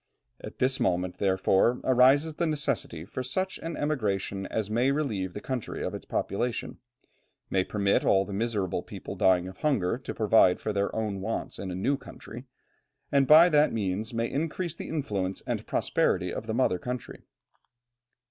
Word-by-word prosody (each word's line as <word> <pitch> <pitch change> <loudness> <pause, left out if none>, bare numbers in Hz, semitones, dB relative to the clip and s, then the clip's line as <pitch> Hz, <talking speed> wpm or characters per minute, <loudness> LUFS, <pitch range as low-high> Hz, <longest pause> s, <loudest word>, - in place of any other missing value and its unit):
At - - -8
this 130 +1 +1
moment, 90 0 0
therefore, 95 +4 +2
arises 135 +5 +4
the 170 +2 -1
necessity 145 - -2
for 130 - -5
such 185 +10 -2
an 165 0 -5
emigration 100 -9 -1
as 110 -3 -2
may 120 +5 +1
relieve 110 -11 -1
the - - -5
country 130 -4 -4
of - - -3
its - - -7
population, 120 +4 -2 0.7
may 95 -1 +2
permit 100 0 +1
all 95 0 +3
the 100 - -7
miserable 105 -3 -1
people - - -8
dying 90 -1 +3
of 95 - -10
hunger 120 -8 0
to 130 - -7
provide 105 -4 +4
for 110 - -3
their 100 0 0
own 105 -3 -2
wants 110 +4 -4
in 95 - -5
a 90 - -4
new 135 +10 0
country, 125 -2 -11 0.7
and 140 -1 +3
by 160 +4 +9
that 150 -1 +4
means 105 0 -2
may 115 0 -1
increase 165 +5 -2
the - - -8
influence 100 -12 -2
and - - -3
prosperity - - +1
of - - -5
the - - -2
mother 90 - +2
country. 125 +5 -6
115 Hz, 170 wpm, -28 LUFS, 95-140 Hz, 0.7 s, by